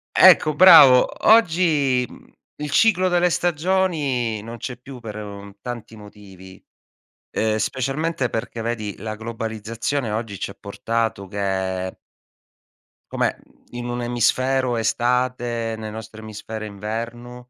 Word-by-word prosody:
Ecco 160 -4 +6
bravo. 150 -8 +8 0.2
Oggi, 160 - +4
mhmm, - - -16 0.3
il 150 -1 -4
ciclo 185 +2 +4
delle 180 0 +3
stagioni 155 - 0
non 115 +2 -8
c'è 125 +2 -6
più 130 +1 -11
per, 110 -3 -8
uhm, 100 -1 -9
tanti 120 -2 -7
motivi, 100 -3 -14 0.7
ehm, 110 -1 0
specialmente 135 +4 -1
perché, 115 0 -4
vedi, 110 -3 -3
la 110 +1 -5
globalizzazione 115 +3 -4
oggi 110 -2 -4
ci 100 - -4
ha - - -11
portato 110 0 -3
che 95 -2 -3 1.2
come, - - 0
mhmm - - -27 0.2
in 120 0 -6
un'emisfero 120 +1 0
è - - 0
estate, 120 0 -1
nel 110 -1 -6
nostro 110 0 -9
emisfero 110 0 -7
è - - -5
inverno 120 +4 -7
120 Hz, 125 wpm, -22 LUFS, 110-135 Hz, 1.2 s, bravo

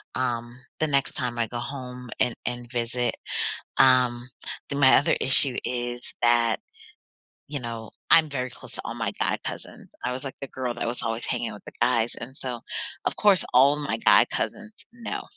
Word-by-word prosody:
um, 120 -1 -2 0.2
the 155 - +3
next 140 -2 +1
time 120 -2 -3
I 115 - +1
go 120 - -5
home 125 -1 -6
and 120 - +2
and 120 -1 -4
visit. 120 0 -1 0.6
Um, 125 -1 +4 0.4
the 140 - -2
my 135 -2 +7
other - - +3
issue 135 -1 +4
is 120 0 -3
that, 120 -1 +4 0.9
you 145 -1 -4
know, 115 -2 -6 0.2
I'm 160 -2 +7
very 130 -2 -2
close - - -12
to - - -5
all - - -3
my - - -1
guy - - +1
cousins. - - -7
I 125 - 0
was 130 +2 -4
like 135 - -6
the 135 - -4
girl 125 -2 -3
that 120 - -3
was 120 - -3
always 115 0 -2
hanging 115 -3 -2
with 105 - -11
the - - -9
guys, 120 -1 +3
and 125 +3 -8
so, 125 -2 -4 0.5
of - - 0
course, 205 -3 +4
all 135 +4 +6
my 145 -1 -2
guy - - +6
cousins 215 +1 -4 0.2
know 235 -1 -5
125 Hz, 185 wpm, -26 LUFS, 120-135 Hz, 0.9 s, my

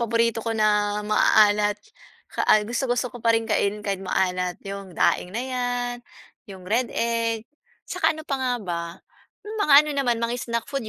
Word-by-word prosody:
paborito 230 0 +1
ko 225 0 -3
na 210 -1 +1
maaalat. 210 -1 +4 0.6
Ka - - -2
ay 210 -1 +5
gusto-gusto 245 +1 -1
ko 245 - -9
pa 230 0 +3
rin 225 - -1
kainin 210 -1 -1
kahit 195 -2 -2
maalat, 180 -1 -1
'yong 195 -3 -8
daing 180 +5 +1
na 245 - -1
'yan, 245 -1 -2 0.5
'yong 190 -2 -10
red 235 +6 0
egg, 230 -1 -1 0.4
'saka 315 - 0
ano 315 - -9
pa 275 -4 -3
nga 255 -1 0
ba? 175 -6 -4 0.6
Mga 420 -7 0
ano 300 - -4
naman 265 -4 +1
mga 235 +1 -2 0.2
snack 235 0 -1
food 275 -6 -4
225 Hz, 170 wpm, -24 LUFS, 205-245 Hz, 0.6 s, ay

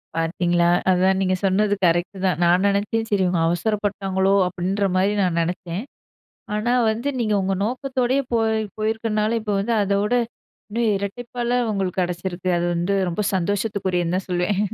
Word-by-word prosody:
பாத்தீங்களா, 170 +1 +1 0.2
அதான் 185 +1 +3
நீங்க 185 -1 +2
சொன்னது 205 +2 +2
கரெக்ட்டு 175 +3 +1
தான். 185 -2 +1
நான் 175 +2 +4
நெனைச்சேன் 210 +3 0
"சரி 200 -3 +2
இவுங்க 180 -1 +1
அவசரப்பட்டாங்களோ" 195 +1 0
அப்டின்ற 190 +3 -1
மாரி 190 +2 +2
நான் 180 -3 +1
நெனச்சேன். 175 +3 -3 0.7
ஆனா 215 +3 0 0.2
வந்து 230 +6 -2
நீங்க 215 -3 +1
உங்க 195 +1 0
நோக்கத்தோடயே 255 +2 0
போய் 225 -1 +2 0.2
போயிருக்றனால, 215 0 0
இப்போ 210 -2 -2
வந்து 230 +3 0
அதோட 200 +3 0 0.6
இன்னும் 215 -2 +1
ரெட்டிப்பால்ல 240 +3 -3 0.2
ஒங்களுக்கெடைச்சிருக்கு. 185 -2 -2
அது 170 - 0
வந்து 175 +4 0
ரொம்ப 175 +4 -2
சந்தோஷத்துக்குரியதுன்னு 190 -2 0
தான் 190 - -4
சொல்லுவேன். 180 +3 0
195 Hz, 140 wpm, -22 LUFS, 180-215 Hz, 0.7 s, நான்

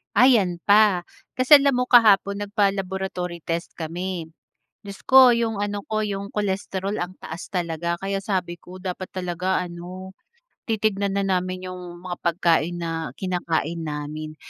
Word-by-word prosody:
Ah, 245 +5 +7
yan 195 -9 +3
pa. 205 -4 +5 0.3
Kasi 255 +3 +7
alam 275 -3 +2
mo, 250 - +1
kahapon 205 -4 +5
nagpa-laboratory 190 -3 -2
test 170 0 -2
kami. 170 +1 -4 0.6
Diyos 200 -1 -9
ko, 260 -2 +8
yung 230 -2 0
ano 205 0 -2
ko, 215 0 0
yung 200 0 -4
cholesterol 195 -1 -2
ang 180 +1 -5
taas 165 +3 -8
talaga. 170 -1 -2
Kaya 195 +1 -3
sabi 185 -4 -2
ko, 180 +1 -11
dapat 185 0 -5
talaga 180 0 -2
ano, 180 +2 -8 0.6
titignan 200 -2 0
na 200 - +1
namin 185 -1 -2
yung 180 -1 -9
mga 175 -1 -4
pagkain 170 0 +1
na 165 -5 -3
kinakain 170 -3 -2
namin. 155 0 -5
185 Hz, 145 wpm, -23 LUFS, 175-200 Hz, 0.6 s, ko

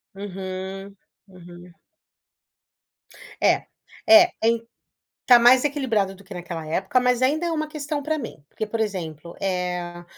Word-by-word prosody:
Uhum, 195 0 -7 0.3
uhum. 175 -1 -14 1.7
É, - - +3 0.4
é, 335 +2 +8
ain 230 0 +2 0.7
tá 245 -2 +8
mais 250 +3 +6
equilibrado 240 -10 0
do 195 - -16
que 195 -1 -11
naquela 170 -3 -6
época, 190 +10 0
mas 250 0 +1
ainda 310 +6 +1
é - - -1
uma 310 -1 -1
questão 300 -1 -4
para 310 +1 -1
mim, 220 - -8
porque 215 - -5
por 225 +2 -4
exemplo, 170 -6 -4
eh, 180 -2 -3
200 Hz, 135 wpm, -23 LUFS, 180-260 Hz, 1.7 s, é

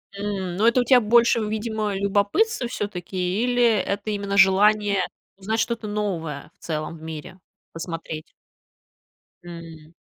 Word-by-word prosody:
М. 200 -3 -3
Но 215 +5 +3
это 245 +2 +4
у - - +1
тя 250 +1 +6
больше, 235 +1 +4
видимо, 215 -1 -2
любопытство 205 - +1
всё-таки, 185 -1 -3
или 245 0 +2
это 210 -2 +1
именно 200 -1 -2
желание 200 +1 +4 0.4
узнать 215 +4 -2
что-то 230 -2 -1
новое 170 -9 -3
в - - -26
целом 155 0 -4
в - - -16
мире, 160 +3 -8 0.3
посмотреть? 165 -2 -6 1.1
М. 165 -2 -11
200 Hz, 130 wpm, -23 LUFS, 175-220 Hz, 1.1 s, тя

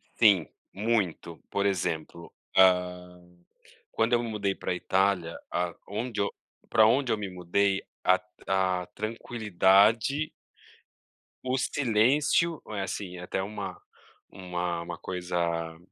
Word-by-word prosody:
Sim, 100 -8 +5 0.3
muito. 105 -4 -1
Por 100 0 0
exemplo, 85 -3 -2 0.3
hã, 90 -1 +3 0.7
quando 115 +2 +1
eu 120 - +4
me 115 - -4
mudei 100 -3 -1
para - - -3
Itália, 95 -2 +1 0.5
aonde 110 +1 -3 0.5
pra 110 - +6
onde 125 +3 +3
eu - - +2
me 100 -2 -4
mudei, 95 +2 0 0.2
a 95 - +5
tran 90 0 -24 0.4
a - - -7
tranquilidade 110 - +2 1.1
o 130 0 0
silêncio, 140 +6 +2
eh, 105 -2 -3
assim 95 -1 -5
até 90 +1 -3
uma 105 - -6 0.5
uma 90 -2 -3
uma 85 0 -6
coisa, 85 -3 -2
95 Hz, 115 wpm, -28 LUFS, 90-110 Hz, 1.1 s, pra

